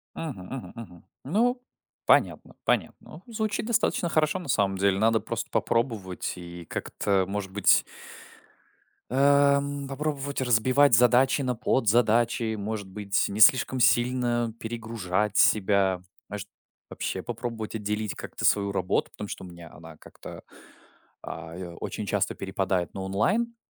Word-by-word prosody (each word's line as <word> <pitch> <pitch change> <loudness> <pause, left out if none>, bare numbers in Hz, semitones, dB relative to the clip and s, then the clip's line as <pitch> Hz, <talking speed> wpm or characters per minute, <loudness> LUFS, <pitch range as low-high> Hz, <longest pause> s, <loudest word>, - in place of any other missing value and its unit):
Мгм 125 - -6
мгм 130 +3 -8
мгм. 90 -7 -11 0.2
Ну, 240 - +1 0.4
понятно, - - +2
понятно. - - -1
Ох - - -12
звучит 215 -2 -2
достаточно 215 -6 +1
хорошо, 155 +3 +1
на 175 - -9
самом 100 -6 +1
деле. 100 0 +2
Надо 110 +1 +3
просто - - -5
попробовать 115 -6 -1
и 85 -1 -9
как-то, 95 +2 -1
может 100 -1 -4
быть 100 0 +4 1.3
эм, 140 +1 +3
попробовать 140 -1 -3
разбивать 130 +3 +3
задачи 125 +4 +4
на 125 -2 -1
подзадачи, 115 0 +2
может 105 -1 -4
быть, 100 0 -1
не 100 +2 -5
слишком 130 +3 +5
сильно 120 -1 +2
перегружать 110 -3 -2
себя. 95 -3 +3 0.3
Может, 100 0 -6 0.4
вообще - - -4
попробовать 115 -2 -5
отделить 105 0 -2
как-то - - -8
свою 100 -1 +2
работу, 95 -1 -1
потому 105 - -8
что - - -7
у - - -9
меня 85 -2 -12
она 80 0 -13
как-то, - - -12 0.8
а, 80 +1 -8
э 90 -1 -7
очень 105 - -4
часто 100 -1 -1
перепадает 95 -2 -2
на 95 - -6
онлайн, 200 - 0
110 Hz, 135 wpm, -26 LUFS, 100-130 Hz, 1.3 s, слишком